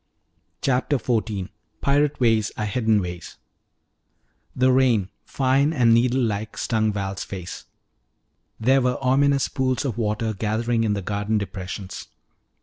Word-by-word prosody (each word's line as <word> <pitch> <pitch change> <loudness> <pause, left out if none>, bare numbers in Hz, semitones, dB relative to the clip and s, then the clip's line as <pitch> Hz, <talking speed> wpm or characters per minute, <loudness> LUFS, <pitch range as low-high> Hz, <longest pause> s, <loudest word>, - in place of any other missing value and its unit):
CHAPTER 135 +2 +1
XIV 110 -6 -2 0.3
PIRATE 145 +1 +2
WAYS 115 -4 +2
ARE 105 - -1
HIDDEN 110 -1 +1
WAYS 90 -1 -7 1.2
The 130 +1 +3
rain, 125 -7 +3 0.2
fine 135 +2 +2
and 120 -6 +4
needle 125 +2 +3
like, 110 -1 -3
stung 110 -2 +1
Val's 95 -1 -3
face. 90 -3 -7 0.9
There 130 +4 +3
were 125 0 +1
ominous 135 +1 +2
pools 130 0 -1
of 120 -3 -3
water 110 0 -1
gathering 115 +3 0
in 105 -2 +1
the 100 -2 -3
garden 105 +2 -1
depressions. 95 -1 -6
115 Hz, 130 wpm, -23 LUFS, 105-130 Hz, 1.2 s, and